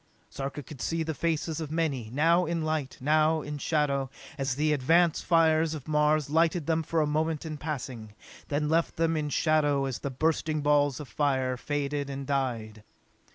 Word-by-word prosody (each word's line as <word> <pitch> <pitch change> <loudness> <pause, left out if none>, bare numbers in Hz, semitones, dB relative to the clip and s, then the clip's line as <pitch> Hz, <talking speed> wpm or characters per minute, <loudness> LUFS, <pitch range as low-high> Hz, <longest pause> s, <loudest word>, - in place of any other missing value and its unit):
Sarka 140 +1 -5
could 135 -1 -10
see 165 0 -1
the 160 0 -3
faces 160 0 -1
of 155 - -4
many, 145 -9 -1
now 165 +6 +3
in 165 -1 -1
light, 155 -4 -2
now 155 +3 +2
in 145 0 -5
shadow, 140 -3 0 0.3
as 135 -3 -1
the 150 +2 +2
advance 165 +5 +3
fires 160 -1 +3
of 150 -2 -9
Mars 150 -1 +2
lighted 165 +1 +2
them 160 +1 +1
for 160 +1 0
a - - +2
moment 155 +1 -1
in 155 -1 -4
passing, 130 -8 -6 0.3
then 150 +1 -1
left 165 +2 +1
them 165 0 +1
in 150 -1 -1
shadow 145 -2 +2
as 130 -4 -3
the 140 - -3
bursting 155 +2 0
balls 145 -1 +2
of 150 - -7
fire 130 -3 0
faded 145 +1 -2
and 140 0 -5
died. 120 -6 -2
150 Hz, 180 wpm, -28 LUFS, 140-160 Hz, 0.3 s, now